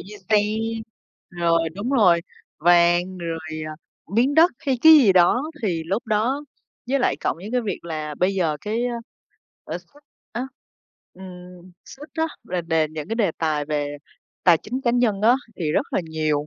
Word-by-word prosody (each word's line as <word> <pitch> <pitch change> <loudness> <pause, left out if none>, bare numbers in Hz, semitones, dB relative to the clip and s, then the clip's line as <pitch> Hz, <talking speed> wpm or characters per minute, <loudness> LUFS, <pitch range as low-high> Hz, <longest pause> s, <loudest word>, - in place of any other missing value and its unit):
như 210 +1 -10
xe, 210 - +6 0.9
rồi 165 -2 +1
đúng 215 +7 -4
rồi, 185 -10 +4 0.4
vàng, 175 +2 +3
rồi, 165 -1 -4 0.3
ờ, 155 - -6 0.4
miếng 260 +5 +3
đất 330 +3 +6
hay 270 -5 -1
cái 320 0 +10
gì 255 -11 +7
đó, 185 +8 +4 0.2
thì 175 -6 -1
lúc 205 +8 -2
đó 235 +7 0 0.4
với 275 +2 +2
lại 245 - +1
cộng - - -1
với 190 +5 -9
cái 250 - +2
việc 210 -6 -5
là 155 -2 -4
bây 185 +4 +1
giờ 165 -5 0
cái, 225 +3 -2
a, 245 - -3 0.7
lãi - - -4
suất 290 0 -23 0.3
á, 240 +3 -3 0.7
ừm, 180 -1 -12
suất 295 +3 -12
á, 320 0 +1 0.2
rồi 180 -1 -3
đền 160 -2 0
những 155 +2 -6
cái 225 - -1
đề 210 -7 +2
tài 155 -2 0
về 145 -1 -2 0.5
tài 175 -3 +7
chính 255 +4 -5
cá 240 - +1
nhân 235 -5 +1
á, 235 +3 +6 0.2
thì 155 -4 -2
rất - - +1
là - - +1
nhiều. 155 -2 -1
185 Hz, 180 wpm, -23 LUFS, 165-240 Hz, 0.9 s, cái